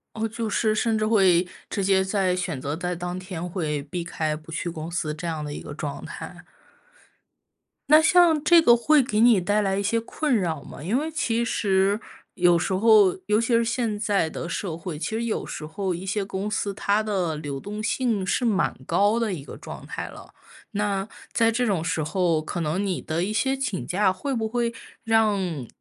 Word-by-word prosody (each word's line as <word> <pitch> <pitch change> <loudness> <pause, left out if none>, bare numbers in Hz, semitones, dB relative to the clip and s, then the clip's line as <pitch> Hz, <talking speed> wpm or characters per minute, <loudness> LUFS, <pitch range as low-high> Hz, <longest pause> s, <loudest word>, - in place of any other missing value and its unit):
哦， 225 0 -1
就 225 0 -4
是 215 +1 +1
甚 225 0 +1
至 215 - 0
会 190 -5 +4 0.2
直 200 - -2
接 190 0 +4
在， 190 -2 +1
选 175 -6 -3
择 145 +3 -3
在 180 +1 -2
当 180 +1 -4
天 180 -2 -6
会 155 -5 -2
避 170 +4 -5
开 155 -2 -2
不 155 +1 -12
去 170 +2 -3
公 160 -1 -6
司 170 -3 -2
这 155 +3 -6
样 160 -2 -3
的 145 - -5
一 - - -6
个 145 - -8
状 150 -2 -5
态。 - - -7 1.6
那 305 +2 +7
像 340 -2 +5
这 340 -1 +7
个 240 -6 +6
会 290 +4 +4
给 215 -4 -1
你 230 -4 +6
带 205 +4 +1
来 195 -1 0
一 200 - -1
些 230 +3 +1
困 290 +5 -2
扰 170 - 0
吗？ - - -11
因 200 +10 0
为 310 +3 -2
其 235 -7 0
实 200 -2 +1 0.4
有 175 -3 +4
时 170 - -2
候， 205 -1 +5
尤 210 +2 +2
其 230 - -1
是 235 -2 +3
现 230 -3 -1
在 200 -6 +1
的 165 - -5
社 170 -1 -3
会， 165 -2 -6
其 150 - -3
实 225 +1 -2
有 225 - -2
时 155 - -6
候， 185 +4 -3
一 180 +3 -6
些 200 +1 -1
公 195 +1 -4
司， 205 -1 -2
它 205 +2 +1
的 185 -7 -1
流 145 -2 -5
动 210 +6 -6
性 220 -4 0
是 245 +7 0
蛮 205 -5 +2
高 205 +3 +3
的 225 -4 0
一 150 -6 -6
个 - - -10
状 - - -9
态 - - -5
了。 - - -12 0.4
那 200 -2 -1 0.3
在 230 -1 +3
这 245 +2 0
种 190 -6 0
时 165 -2 -1
候， 165 0 +1
可 170 +2 -4
能 165 +5 -1
你 185 -3 -2
的 160 +2 -2
一 210 - -3
些 265 +5 +1
请 260 -8 -3
假， 190 +1 +2
会 270 +9 -3
不 225 -3 -1
会 235 +1 -1 0.3
让 200 - +1
195 Hz, 230 characters per minute, -25 LUFS, 170-225 Hz, 1.6 s, 那